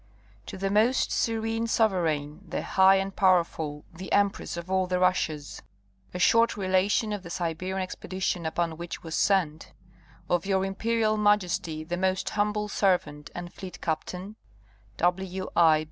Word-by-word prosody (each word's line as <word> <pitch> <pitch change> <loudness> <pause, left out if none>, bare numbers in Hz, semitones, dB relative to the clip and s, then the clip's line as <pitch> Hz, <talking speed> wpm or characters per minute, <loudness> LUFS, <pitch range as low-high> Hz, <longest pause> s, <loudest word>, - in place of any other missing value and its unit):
To - - -7
the 195 +1 -1
most 225 +5 +3
Serene 225 0 0
Sovereign, 170 -8 0
the - - -3
high 190 0 +5
and 195 0 -1
powerful, 165 -6 +1
the 185 +3 -8
Empress 200 -3 +1
of 170 +2 -6
all 190 -1 +2
the 180 0 0
Russias: 160 -5 0 0.5
A - - -5
short 230 +5 +4
relation 200 +3 +1
of 205 - -4
the 175 - -10
Siberian 175 +2 -3
Expedition 185 -1 -3
upon 165 0 -2
which 170 0 -7
was 165 -1 -7
sent 165 -6 +1 0.5
Of 175 +1 0
your 190 -1 +2
Imperial 215 +2 0
Majesty 190 -6 +1
the 175 +2 -3
most 185 0 0
humble 210 0 0
servant 175 -8 0
and 175 0 -7
fleet 190 -2 -9
captain, 180 +6 -4 0.6
W. 185 - -1
I. 160 -2 +6
185 Hz, 145 wpm, -27 LUFS, 170-200 Hz, 0.6 s, I